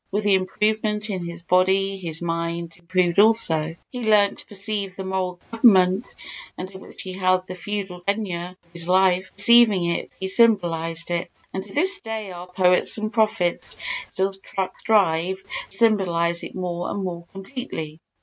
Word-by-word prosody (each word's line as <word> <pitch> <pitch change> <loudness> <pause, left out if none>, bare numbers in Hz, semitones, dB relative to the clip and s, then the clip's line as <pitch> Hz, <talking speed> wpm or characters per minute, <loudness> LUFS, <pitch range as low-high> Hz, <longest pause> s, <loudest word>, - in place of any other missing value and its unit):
With 205 +2 -1
the 205 -1 +3
improvement 210 +2 0
in 185 -3 -3
his 170 0 -8
body 190 +2 +2
his 170 -3 -5
mind 170 0 -3
improved 175 +1 0
also. 165 -8 +4 0.2
He 250 - -6
learnt 210 -3 +3
to - - -10
perceive 200 -1 -2
the 195 - -6
moral 185 -1 -3
government 200 -2 +4 0.5
under 190 +1 -7
which - - -10
he 185 - -6
held 185 0 +1
the 185 - -7
feudal 190 -1 -5
tenure 185 -3 -3
of 170 - -32
his 170 0 -3
life—perceiving 190 +3 +4
it - - -3
he 190 - -3
symbolised 175 -6 +2
it, 170 -1 -2 0.2
and 190 - -3
to - - -14
this 380 +6 +4
day 220 - -6
our 175 0 -9
poets 180 +2 +3
and 215 +1 -3
prophets 210 -6 0 0.3
still 190 +1 -1 0.5
strive 190 -3 +1 0.3
to 195 - -8
symbolise 175 -6 +2
it - - -8
more 175 -1 -3
and 200 - -3
more 170 -2 -5
completely. 195 - -7
190 Hz, 160 wpm, -23 LUFS, 175-210 Hz, 0.5 s, also